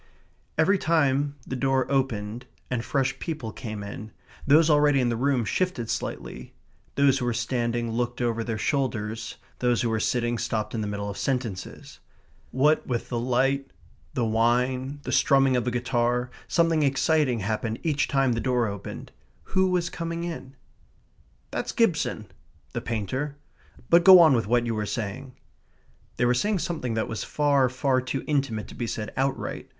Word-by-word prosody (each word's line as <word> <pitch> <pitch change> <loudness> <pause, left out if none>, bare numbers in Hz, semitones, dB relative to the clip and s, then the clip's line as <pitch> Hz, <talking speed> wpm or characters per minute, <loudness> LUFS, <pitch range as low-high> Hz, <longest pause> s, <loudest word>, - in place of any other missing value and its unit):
Every 190 +5 +3
time 145 -4 +1
the 130 - -4
door 135 0 +1
opened 125 -3 -1 0.2
and 120 -2 -1
fresh 135 +1 -1
people 150 -9 -4
came 110 -4 -6
in, 105 +2 -8 0.4
those 155 +3 +6
already 145 -2 +4
in 125 -2 +2
the 120 - 0
room 130 -1 +1
shifted 150 - -1
slightly; - - -5 0.4
those 140 -1 +4
who 125 - -2
were 120 -1 0
standing 120 -2 -1
looked 120 +1 -2
over 115 -2 0
their 115 -1 -3
shoulders; 110 -4 -2 0.2
those 120 -1 +1
who 115 - 0
were 110 - 0
sitting 120 +1 0
stopped 110 -2 -2
in 115 - -2
the 105 - -2
middle 100 0 -4
of 100 - -5
sentences. 120 -9 -4 0.5
What 150 +4 +2
with 120 -2 -2
the 120 - -1
light, 135 +3 +1 0.5
the 120 - +1
wine, 125 +5 +1
the - - -4
strumming 135 -2 +4
of 125 -1 0
a - - +3
guitar, 120 0 0 0.2
something 165 -2 +2
exciting 140 -3 +2
happened 110 +2 -2
each 150 -4 +1
time 135 -2 +2
the 115 - -2
door 125 -2 +1
opened. 100 -2 -6 0.4
Who 190 0 +3
was 175 -2 0
coming 165 0 -4
in? 160 -6 -6 1.0
"That's - - -3
Gibson." 175 - +1 0.5
"The - - -2
painter?" 125 +6 -3 0.6
"But 170 0 +7
go 185 -1 +10
on 160 -4 +7
with 115 -4 +1
what 120 +1 +2
you 115 - -1
were 105 -1 -2
saying." 120 +5 -4 0.8
They 120 - +2
were 120 - +4
saying 205 +11 +1
something 160 -9 -3
that 110 - -1
was 110 - -4
far, 140 -3 +2
far 130 +1 +1
too 130 +1 -3
intimate 135 -8 -1
to - - -10
be 120 - -4
said 110 -1 -4
outright. 135 0 -2
125 Hz, 170 wpm, -26 LUFS, 115-140 Hz, 1.0 s, go